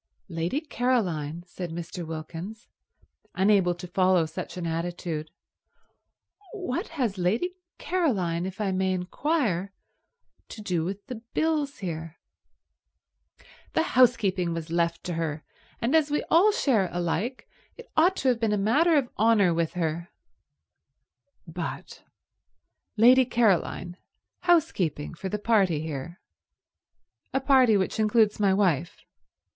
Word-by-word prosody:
"Lady 170 - -2
Caroline?" 180 - -1
said 175 0 -7
Mr. 170 +1 -6
Wilkins, 165 +7 -7 0.7
unable 190 -2 +3
to 175 +1 -8
follow 185 -1 +3
such 155 - -7
an 175 - -4
attitude. 165 -1 -3 1.2
"What 360 - -3
has 225 -8 -1
Lady 220 - 0 0.2
Caroline, 190 - 0
if 190 +2 -8
I 205 -2 0
may 190 0 0
inquire, 200 - -1 0.8
to - - -9
do 180 -6 -1
with 195 +4 -5
the 250 -5 -7
bills 305 -3 0
here?" 165 -1 -5 1.6
"The 320 - +2
housekeeping 205 -9 +3
was 165 -1 -6
left 170 0 0
to 180 - -3
her, 160 -2 -3 0.4
and 240 +7 +1
as 310 -2 +3
we 295 - 0
all 365 +6 +6
share 260 - +1
alike 175 +8 -2 0.3
it 475 - -13
ought 350 +4 +4
to 265 - +1
have 245 -2 +1
been 225 -2 +1
a - - +1
matter 290 - +3
of 270 -4 +1
honour 210 -5 +4
with 165 0 -1
her—" 170 0 -2 1.4
"But—Lady 250 +4 -1
Caroline 200 -6 +1 0.4
housekeeping 195 - +1
for 190 +3 -6
the 210 - -2
party 200 -7 +2
here? 160 +2 -6 1.2
A - - +4
party 260 -5 +4
which 190 +3 -1
includes 215 -1 +3
my 200 -2 +3
wife? 175 -5 0
190 Hz, 125 wpm, -26 LUFS, 170-250 Hz, 1.6 s, all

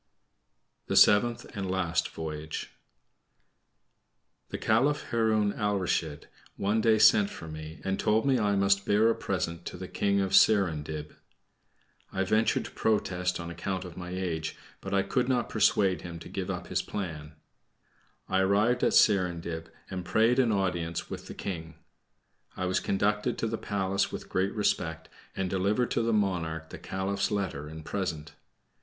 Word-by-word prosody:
THE - - -1
SEVENTH 120 +3 +4
AND 100 -2 -3
LAST 90 -3 0
VOYAGE 80 -1 -6 1.8
The - - -4
Caliph 135 +7 +2
Haroun 110 -3 +2
Alrashid 95 -7 -1 0.3
one 105 +3 +1
day 110 0 +4
sent 105 -2 +6
for 80 - -9
me, 80 0 -8
and 95 0 -1
told 110 +3 +2
me 135 -3 +3
I 105 -2 +2
must 100 0 +2
bear 110 +3 +4
a - - -1
present 85 0 -3
to - - -6
the 95 +1 -6
King 100 +1 +1
of 95 -1 0
Serindib. 80 -7 +3 1.0
I 95 - 0
ventured 110 +4 +2
to - - -8
protest 90 -5 0
on 85 0 -5
account 95 +2 -4
of 90 -2 -9
my 90 -1 -7
age, 85 -4 -3 0.2
but 95 - -6
I 100 -1 +2
could 125 +6 0
not 125 -2 +1
persuade 100 -4 +2
him 85 -1 -7
to 85 - -10
give 95 -1 -4
up 90 -2 -3
his - - -1
plan. 80 -6 -6 0.9
I 95 - +1
arrived 105 +6 +2
at - - +3
Serindib, 85 -5 +2 0.2
and 90 -1 -4
prayed 115 +7 +3
an 120 -3 +3
audience 85 -5 -1
with - - -6
the - - -8
King. 80 -4 -5 0.8
I 95 - -1
was 90 0 +1
conducted 105 +4 0
to - - -1
the 115 0 -1
palace 100 -3 -1
with - - -7
great 95 +2 0
respect, 80 -6 -1 0.3
and 95 - 0
delivered 100 +6 0
to - - +1
the 115 0 +1
monarch 80 -6 -1
the - - -8
Caliph's 100 +1 -2
letter 95 -8 -2
and 80 0 -9
present. 90 -7 -3
95 Hz, 160 wpm, -29 LUFS, 85-105 Hz, 1.8 s, sent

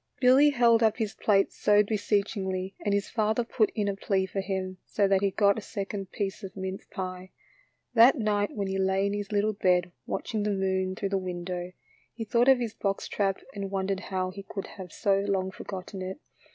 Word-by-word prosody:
Billy 260 +4 +6
held 240 -4 +4
up 220 -2 +3
his 220 -3 -2
plate 195 -2 +2
so 210 0 +4
beseechingly 200 -2 -1
and 205 - 0
his 200 0 +1
father 220 +1 +1
put 225 -2 +1
in 210 -2 0
a 200 - 0
plea 195 -1 0
for 195 +1 -3
him, 190 -1 -3
so 200 -2 +1
that 195 -1 +3
he 200 - +3
got 200 +1 +3
a - - -8
second 200 -2 -5
piece 195 -2 -3
of 195 0 -8
mince 190 0 -5
pie. 185 -1 -5 0.6
That 245 +5 +7
night 210 -3 0
when 200 -2 -1
he 190 0 -2
lay 190 +1 +2
in 200 - 0
his 205 0 -4
little 210 +1 +1
bed 180 -3 +2 0.2
watching 220 -3 -2
the 210 - 0
moon 190 -1 0
through 195 +1 -2
the 195 0 0
window, 180 0 -5 0.4
he 225 -1 -4
thought 235 +3 +2
of 265 - +7
his 235 -3 -3
box 195 -3 -2
trap 195 -2 -1
and 200 -1 -4
wondered 195 0 -1
how 185 -1 -3
he 200 +2 -8
could 195 0 -6
have 185 -3 -9
so 195 -1 +1
long 195 -2 -1
forgotten 190 0 -7
it. 185 +7 -5
195 Hz, 205 wpm, -28 LUFS, 190-210 Hz, 0.6 s, That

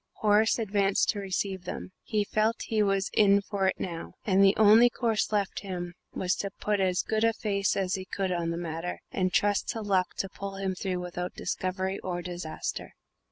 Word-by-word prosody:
Horace 215 +1 +3
advanced 200 -3 +1
to 205 - +1
receive 190 -1 -3
them; - - -6
he 210 -2 0
felt 215 +2 0
he 220 -1 0
was 195 -1 +1
in 200 -1 +5
for 200 -1 -1
it - - 0
now, 170 -2 -5
and 195 -2 +4
the 195 +1 +6
only 220 +3 +7
course 230 -3 0
left 205 -2 0
him 180 -3 -5 0.2
was 185 0 0
to 200 - -2
put 210 -1 0
as 185 -1 +1
good 220 0 0
a 230 0 +4
face 200 -3 0
as 190 -1 0
he 190 -1 -3
could 190 0 -2
on 170 -2 -1
the 170 - -2
matter, 170 +1 -4
and 185 -1 0
trust 205 0 +2
to 225 - -2
luck 190 -3 +1
to 195 - -1
pull 195 +1 -7
him 195 -1 -2
through 185 -1 -3
without 180 0 -5
discovery 190 +1 -2
or 175 -1 -4
disaster. 175 -3 -5
195 Hz, 200 wpm, -28 LUFS, 185-205 Hz, 0.2 s, only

